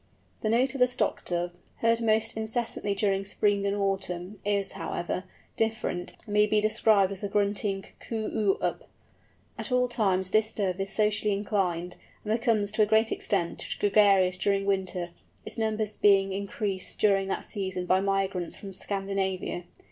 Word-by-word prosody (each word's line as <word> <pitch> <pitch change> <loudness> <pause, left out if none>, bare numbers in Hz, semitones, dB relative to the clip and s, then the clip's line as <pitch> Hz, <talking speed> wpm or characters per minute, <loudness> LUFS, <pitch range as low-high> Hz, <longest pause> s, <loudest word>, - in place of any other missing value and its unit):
The 215 - 0
note 255 +4 +2
of 275 - -5
the 250 - +6
Stock 240 -4 -1
Dove, 175 0 -1 0.2
heard 230 0 +2
most 225 0 +2
incessantly 220 -2 -2
during 195 -1 +1
spring 200 0 +1
and 200 -1 +1
summer 180 +1 -5
is, 200 -1 0
however, 180 +2 -4 0.3
different, 220 -5 -2
and 210 - -6
may 210 0 +5
be 215 0 +3
described 210 -2 +3
as 195 - -7
a 205 - -3
grunting 200 -1 0
coo 220 -2 -4
oo 205 -3 +2
up. - - -2 0.7
At - - -5
all 250 0 +3
times 190 -6 +1
this 215 0 +3
Dove 195 -3 -1
is 195 - -2
socially 210 0 +1
inclined, 185 -4 -1 0.3
and 215 - +1
becomes, 220 -3 +1
to 215 - +1
a 210 - +5
great 220 +1 +3
extent, 175 -5 -1
gregarious 195 -3 +4
during 195 +1 +1
winter; 190 -3 -1 0.4
its - - -7
numbers 215 -1 -1
being 195 -1 +4
increased 195 -1 -3
during 195 -2 +3
that - - -2
season 190 -2 -3
by 185 +1 +3
migrants 195 -3 -1
from 195 -1 -9
Scandinavia. 195 -2 -2
200 Hz, 165 wpm, -28 LUFS, 190-215 Hz, 0.7 s, the